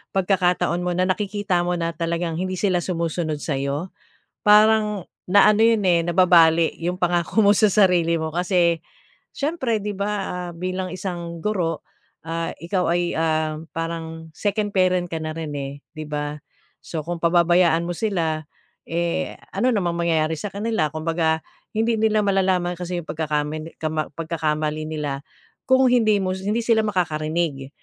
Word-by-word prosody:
pagkakataon 180 -2 +1
mo 180 - -1
na 185 +1 +1
nakikita 195 -2 0
mo 175 0 0
na 165 0 -1
talagang 170 0 -2
hindi 185 0 -2
sila 185 -3 +2
sumusunod 165 -3 -2
sa'yo 140 +4 -2 0.5
parang 210 -2 +5 0.2
na-ano 205 +3 +5
'yon, 225 -2 +4
eh, 170 -1 +4
nababali 170 -2 +5
'yong 175 +2 -2
pangako 175 +4 +2
mo 200 - +6
sa 215 - +5
sarili 180 -5 +4
mo. 160 0 -3
Kasi 175 -2 +2 0.6
siyempre, 275 -7 -1
'di 210 0 -3
ba, 200 +2 -2 0.2
ah, 180 -1 -5
bilang 185 +1 -3
isang 175 -2 -5
guro, 180 -7 -1 0.4
ah, 165 0 -2
ikaw 180 +1 -1
ay, 175 0 0
um, 155 0 -1
parang 165 0 -5
second 205 0 -1
parent 185 -1 +3
ka 165 - -2
na 155 0 -3
rin, 160 -2 -5
eh, 140 -1 -4 0.2
'di 155 -1 -6
ba. 150 0 -3 0.4
So 160 -2 -5
kung 175 0 -4
pababayaan 170 0 +4
mo 175 - -2
sila, 165 -7 -1 0.5
eh, 170 0 -2 0.2
ano 250 - +2
namang 180 -6 0
mangyayari 160 -2 +1
sa 210 - -4
kanila. 205 -6 -1
Kumbaga 160 +1 0 0.4
hindi 225 +1 +2
nila 215 -1 +3
malalaman 185 -3 +1
kasi 180 0 -3
'yong 165 - -9
pagkakamili 155 0 -3
kama 155 -1 -2
pagkakamali 155 -1 -2
nila 145 -3 -3 0.5
kung 260 0 +5
hindi 220 -4 +4
mo 185 -1 -1
hindi 205 +5 -1
sila 230 -2 +4
makakarinig 155 -6 -1
175 Hz, 150 wpm, -22 LUFS, 160-195 Hz, 0.6 s, mo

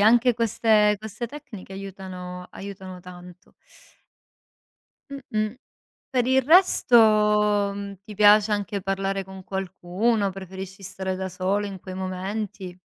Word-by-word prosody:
anche 240 +4 +5
queste 220 -2 +3
queste 215 +3 -6
tecniche 235 -8 -10
aiutano 185 -2 -7
aiutano 190 -2 -8
tanto. 180 0 -13 1.6
Mh, 280 - -5
mh. 215 0 -1 0.6
Per 250 -2 +1
il 260 +1 +4
resto, 320 -5 +5 0.8
mhmm, 200 -1 -7
ti 215 - -9
piace 210 +1 +6
anche 200 -1 -2
parlare 195 0 -1
con 190 0 -10
qualcuno? 195 +3 -1
Preferisci 190 0 -8
stare 190 0 -4
da 190 0 -3
solo 190 +3 0
in 195 -2 -7
quei 185 0 -8
momenti? 190 0 -5
195 Hz, 120 wpm, -25 LUFS, 185-215 Hz, 1.6 s, piace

